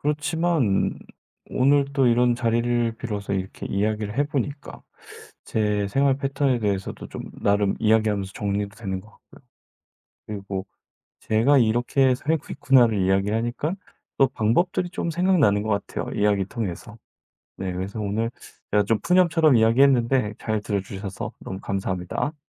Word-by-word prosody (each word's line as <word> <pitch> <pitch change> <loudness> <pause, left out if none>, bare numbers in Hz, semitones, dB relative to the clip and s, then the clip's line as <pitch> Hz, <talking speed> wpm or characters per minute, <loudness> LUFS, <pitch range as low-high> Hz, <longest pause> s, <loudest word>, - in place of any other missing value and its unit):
그렇지만 150 - 0 0.5
오늘 140 +2 +3
또 135 -2 +3
이런 120 0 +4
자리를 120 -1 0
빌어서 105 -4 -4
이렇게 95 -1 -4
이야기를 105 +1 -1
해 145 - +3
보니까 145 0 -4 0.6
제 105 -2 0
생활 135 +5 +2
패턴에 135 -2 0
대해서도 100 -2 -3
좀 - - -7 0.2
나름 100 -1 +2
이야기하면서 110 -3 +2
정리도 100 0 -3
되는 95 -4 -4
것 105 - -17
같고요. - - -21 0.9
그리고 100 -2 -5 0.5
제가 120 +7 +3
'이렇게 120 +3 +2
살고 150 +4 -2
있구나.'를 120 -5 +4
이야기하니까 110 - 0 0.4
또 135 - +5
방법들이 175 +11 +1
좀 170 -1 -3
생각나는 160 - +3
것 110 - -4 0.2
같아요 - - -5
이야기 100 -1 +2
통해서. 105 +1 -6 0.6
네 95 -1 -3
그래서 95 +4 -5
오늘 105 +3 -1 0.4
제가 105 0 +4
좀 110 +1 +1
푸념처럼 165 -7 +4
이야기했는데 120 -1 +3
잘 110 -2 -2
들어 100 -1 -1
주셔서 95 0 -6
너무 95 - -6
감사합니다. 95 - -3
110 Hz, 335 characters per minute, -24 LUFS, 100-135 Hz, 0.9 s, 또